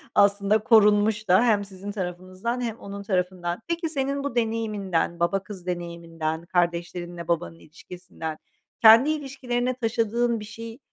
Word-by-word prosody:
aslında 200 +1 +4
korunmuş 210 -1 +4
da 185 +6 +5
hem 210 -4 +3
sizin 195 +1 -8
tarafınızdan 185 +5 -4
hem 230 -2 -3
onun 200 0 -7
tarafından. 180 -1 -2
Peki, 335 -1 -1
senin 275 -1 -2
bu 280 -4 -4
deneyiminden, 210 -7 -1
baba 190 +3 +1
kız 190 -4 -10
deneyiminden, 170 -2 -4
kardeşlerinle 175 0 -2
babanın 85 - -2
ilişkisinden 165 - -8 0.4
kendi 230 +5 +8
ilişkilerine 255 -4 -2
taşıdığın 235 -1 0
bir 210 - -8
şey 230 +2 -9
200 Hz, 130 wpm, -25 LUFS, 175-230 Hz, 0.4 s, kendi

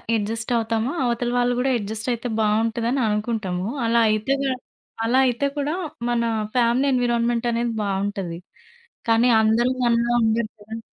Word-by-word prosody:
Adjust 225 +2 -2
అవుతామో 225 +2 -1
అవతల 240 0 -1
వాళ్ళు 245 0 +2
కూడా 265 +1 +1
అడ్జస్ట్ 220 +2 -4
అయితే 235 +1 -4
బావుంటుందని 225 +4 +1
అనుకుంటాము. 210 -4 -2 0.2
అలా 230 +1 +3
అయితే 215 +5 +1
గా 270 - 0 0.5
అలా 245 +3 +3
అయితే 250 +3 0
కూడా 290 +2 -1 0.4
మన 240 -1 +1 0.3
ఫ్యామిలీ 245 +2 +3
ఎన్విరాన్మెంట్ 240 -1 +1
అనేది 235 0 -1
బావుంటది. 195 -3 -2 0.7
కానీ 230 +2 +4
అందరూ 225 +3 +3 0.2
మనలా 235 0 +2
ఉండరు 220 0 +1
కదా! 220 +2 -8
230 Hz, 135 wpm, -23 LUFS, 220-240 Hz, 0.7 s, కానీ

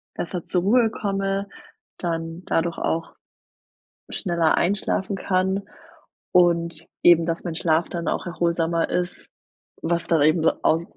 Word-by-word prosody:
besser 175 0 -4
zur 180 - 0
Ruhe 225 +2 +4
komme, 195 -1 -2 0.5
dann 165 0 -3
dadurch 165 +1 0
auch 165 0 -2 1.0
schneller 170 -4 +1
einschlafen 195 +1 0
kann 190 +1 0 0.7
und 170 -2 +3 0.2
eben, 170 -1 +6
dass 165 0 -2
mein 170 -3 -3
Schlaf 165 0 +1
dann 170 0 -3
auch - - -1
erholsamer 170 -1 0
ist, 180 0 -3 0.5
was 170 +1 -1
dann 165 -3 +3
eben 155 +3 +4
so 165 - +4
aus 165 +1 +3
170 Hz, 130 wpm, -23 LUFS, 165-185 Hz, 1.0 s, eben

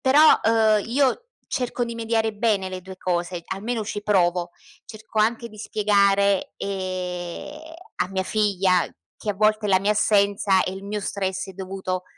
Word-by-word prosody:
però, 295 +4 +6
uhm, 220 -2 +3
io 270 - +1 0.2
cerco 250 -2 -2
di 235 0 -6
mediare 225 -1 0
bene 205 -3 0
le 185 0 -5
due 190 +1 -10
cose, 175 -1 -2
almeno 220 +3 -3
ci 205 0 -5
provo. 180 -4 +1 0.4
Cerco 215 0 -7
anche 230 +2 +1
di 215 -1 -15
spiegare, 200 -2 +2
ehm, 185 - -4 0.4
a - - -1
mia 190 0 -1
figlia 190 -3 +2 0.3
che 210 - -3
a - - -3
volte 215 +1 +2
la 190 -2 +4
mia 200 - +1
assenza 200 -2 +3
e 185 - -3
il 195 +1 -8
mio 210 +1 -3
stress 190 -1 -3
è - - -8
dovuto 185 -1 -4
200 Hz, 165 wpm, -23 LUFS, 185-220 Hz, 0.4 s, però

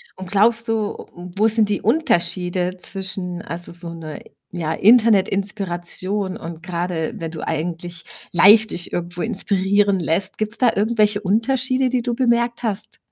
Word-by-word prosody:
Und 185 -1 -9
glaubst 230 +3 +3
du 220 -2 -2
wo 180 +5 -1
sind 220 -1 +2
die 205 - -1
Unterschiede 185 - 0
zwischen 185 -2 -4
also, 170 +1 -5
so 170 -1 -5
'ne, 155 -2 -8 0.3
ja, 165 -3 -2
Internetinspiration 195 -3 +1
und 165 -5 -9
grade, 175 -2 -3
wenn 165 -1 -5
du 160 - -7
eigentlich 170 +1 -4 0.3
leicht 210 +5 +6
dich 175 - -4
irgendwo 175 0 -4
inspirieren 195 0 +1
lässt? 175 +4 -1
Gibt's 215 +1 -2
da 245 -3 +4
irgendwelche 210 -1 +2
Unterschiede, 255 +5 +1
die 250 -1 0
du 240 -1 -2
bemerkt 235 -1 +1
hast? 215 -1 -3
195 Hz, 140 wpm, -21 LUFS, 175-220 Hz, 0.3 s, leicht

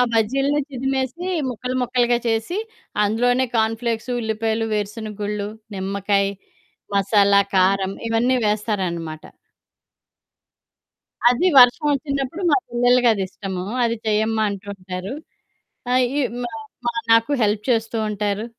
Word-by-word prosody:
బజ్జీల్నే 270 +6 +1
చిదిమేసి, 265 +4 -2 0.2
ముక్కలు 250 +1 -4
ముక్కలుగా 245 -1 +2
చేసి, 225 - -1 0.5
అందులోనే 245 +5 +2
కార్న్‌ఫ్ల్‌క్సు, 225 +1 -1
ఉల్లిపాయలు, 220 0 -1
వేరుసెనగ 210 0 -3
గుళ్ళు, 205 0 -2 0.3
నిమ్మకాయ, 200 +1 0 0.7
మసాలా, 200 0 +4
కారం 190 +1 +3 0.2
ఇవన్నీ 235 +3 +2
వేస్తారనమాట. 185 -7 -2 2.1
అది 250 +9 +1
వర్షం 250 +5 +7
వచ్చినప్పుడు 275 +3 -2
మా - - +5
పిల్లలకి 245 +1 +3
అదిష్టము. 190 -2 -4 0.2
"అది 230 0 0
చెయ్యమ్మా" 220 +1 +1
అంటూ 200 0 -7
ఉంటారు. 185 +1 -6 0.8
ఆహ్, 255 0 +4
ఈ - - +2 0.2
మా, 240 - -4 0.4
మా 240 - 0 0.2
నాకు 230 +5 +4
హెల్ప్ 210 0 +1
చేస్తూ 225 -1 +1
ఉంటారు. 210 +1 -2
225 Hz, 105 wpm, -21 LUFS, 200-245 Hz, 2.1 s, వర్షం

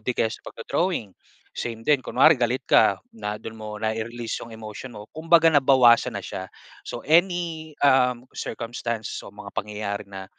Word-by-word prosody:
'di 125 - -1
kaya 110 - +1
sa - - -9
pagdo-drawing, 115 - -2 0.4
same 115 -1 -5
din. 145 0 +3
Kunwari 150 +3 +5
galit 125 +2 0
ka 100 - +5 0.2
na 105 -1 -4
du'n 110 - -7
mo 105 -1 -7
nai-release 115 +2 -3
'yong 115 -1 -9
emotion 110 +3 -9
mo. 105 - -8
Kumbaga 165 +1 +4
nabawasan 130 -4 +5
na - - -5
siya. 95 -1 -6 0.4
So - - -6
any, 165 -1 +1
um, 125 -3 +4
circumstance 115 -1 -4
o - - -9
mga 100 -1 -10
pangyayari 105 0 -4
na, 95 -1 -8
120 Hz, 160 wpm, -24 LUFS, 110-140 Hz, 0.4 s, Kunwari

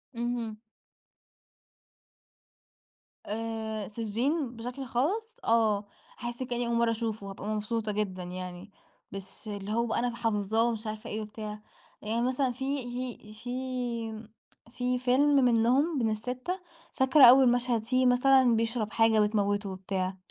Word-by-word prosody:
اهم. 235 -2 -2 2.7
آآ، 220 -1 -3
سجّين 235 +5 -1
بشكل 245 +4 -6
خاص 330 - 0 0.2
آه، 220 -3 +3 0.4
هاحس 240 +1 -4
كأني 245 -1 -2
أول 235 - 0
مرّة 235 0 +3
أشوفه. 220 -3 -3
هابقى 195 +1 -7
مبسوطة 215 0 -1
جدًا 195 -3 -2
يعني، 180 +2 -7 0.4
مش 195 -1 -6 0.2
اللي 205 0 -4
هو 235 +1 +2
بقى 225 - -1
أنا 240 0 -1
حافظاه 220 -1 +1
ومش 225 -2 -1
عارفة 215 0 -5
إيه 215 +1 -3
وبتاع. 215 0 -7 0.4
يعني 225 +3 -1
مثلًا 255 +1 +1
في 270 +2 -2
في 245 -3 -6
في 240 -2 -4 0.5
في 250 0 -1
فيلم 260 +4 +3
منهم 255 +5 +3
من 225 -2 +2
ال6، 255 - -3 0.3
فاكرة 265 +1 +6
أول 250 0 +8
مشهد 240 -2 0
فيه 255 +1 +2
مثلًا 250 -1 +5
بيشرب 225 -1 -1
حاجة 225 -1 +4
بتموته 205 -1 +1
وبتاع. 190 0 -3
230 Hz, 130 wpm, -29 LUFS, 215-250 Hz, 2.7 s, أول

